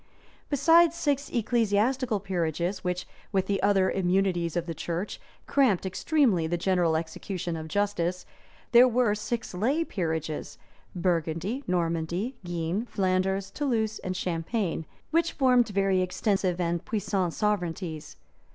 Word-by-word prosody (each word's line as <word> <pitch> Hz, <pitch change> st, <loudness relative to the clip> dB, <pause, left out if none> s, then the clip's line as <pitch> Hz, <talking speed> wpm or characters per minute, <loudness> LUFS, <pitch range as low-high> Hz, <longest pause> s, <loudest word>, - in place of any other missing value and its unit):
Besides 330 Hz, +4 st, +5 dB
six 285 Hz, -3 st, 0 dB
ecclesiastical 235 Hz, +1 st, +1 dB
peerages, 175 Hz, -1 st, -1 dB
which, 180 Hz, -1 st, -2 dB, 0.2 s
with 190 Hz, -2 st, +1 dB
the 195 Hz, 0 st, -1 dB
other 195 Hz, -1 st, +3 dB
immunities 180 Hz, -2 st, +1 dB
of 170 Hz, -, -1 dB
the 170 Hz, -, -4 dB
church, 170 Hz, +5 st, -4 dB, 0.2 s
cramped 245 Hz, -10 st, +2 dB
extremely 190 Hz, -, +2 dB
the 175 Hz, +2 st, -1 dB
general 175 Hz, -2 st, +2 dB
execution 170 Hz, +1 st, -4 dB
of 160 Hz, -1 st, -5 dB
justice, 180 Hz, -1 st, -1 dB, 0.5 s
there 245 Hz, +1 st, +8 dB
were 245 Hz, -3 st, +2 dB
six 215 Hz, +1 st, -3 dB
lay 260 Hz, -, +1 dB
peerages, 160 Hz, -, -3 dB, 0.4 s
Burgundy, 175 Hz, -, -1 dB
Normandy 175 Hz, +6 st, -1 dB
Guienne, 175 Hz, +5 st, -2 dB
Flanders, 190 Hz, 0 st, 0 dB
Toulouse, 225 Hz, -6 st, -1 dB
and 185 Hz, 0 st, -4 dB
Champagne, 170 Hz, 0 st, -2 dB, 0.2 s
which 335 Hz, +1 st, +2 dB
formed 250 Hz, -3 st, +4 dB
very 195 Hz, -2 st, +2 dB
extensive 185 Hz, -1 st, 0 dB
and 170 Hz, 0 st, -1 dB
puissant 195 Hz, -5 st, -1 dB
sovereignties. 175 Hz, -6 st, -2 dB
190 Hz, 125 wpm, -27 LUFS, 175-225 Hz, 0.5 s, there